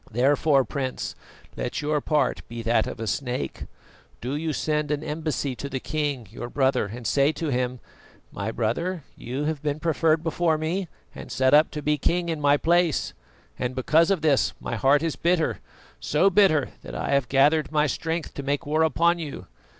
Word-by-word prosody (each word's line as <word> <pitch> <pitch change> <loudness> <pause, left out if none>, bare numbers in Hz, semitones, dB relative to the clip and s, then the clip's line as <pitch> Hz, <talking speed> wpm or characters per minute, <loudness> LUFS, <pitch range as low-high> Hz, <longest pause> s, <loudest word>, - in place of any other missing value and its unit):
Therefore, 135 +3 +3
Prince, 130 -3 -3 0.4
let 120 - -3
your 150 0 0
part 150 +1 +1
be 115 0 -6
that 115 0 +2
of - - -6
a 115 - -3
snake. 125 +5 -3 0.5
Do 130 +4 -3
you 160 +1 -2
send 150 0 -1
an 150 0 -1
embassy 150 -3 -2
to 140 - -5
the 135 -1 -3
king, 145 -5 -2
your 120 +1 -6
brother 135 -5 +1
and 115 +3 -8
say 140 +6 +3
to 160 -1 -3
him: 125 -1 -1 0.5
"'My 100 +2 -3
brother, 145 +10 -2
you 130 +5 -4
have 155 -1 -2
been 150 0 -2
preferred 160 0 +2
before 165 -1 +1
me 170 +4 -2 0.3
and - - -9
set 130 +1 +2
up 150 +2 +6
to 150 -2 -6
be 150 0 +1
king 170 +4 0
in 160 -2 -2
my 145 0 +4
place, 170 0 +1 0.5
and 125 +1 -2
because 160 +6 +3
of 190 -6 +1
this 145 -4 +3
my - - -4
heart 140 +6 +3
is 165 -2 -1
bitter, 170 -2 +1 0.4
so 180 +7 +2
bitter 170 -8 +4
that - - -9
I - - -3
have 140 -2 +1
gathered 145 +4 +3
my 150 -1 +3
strength 160 +2 -3
to - - -5
make 140 +1 -2
war 155 +2 +1
upon 170 +3 +3
you. 145 - -6
150 Hz, 190 wpm, -25 LUFS, 130-160 Hz, 0.5 s, up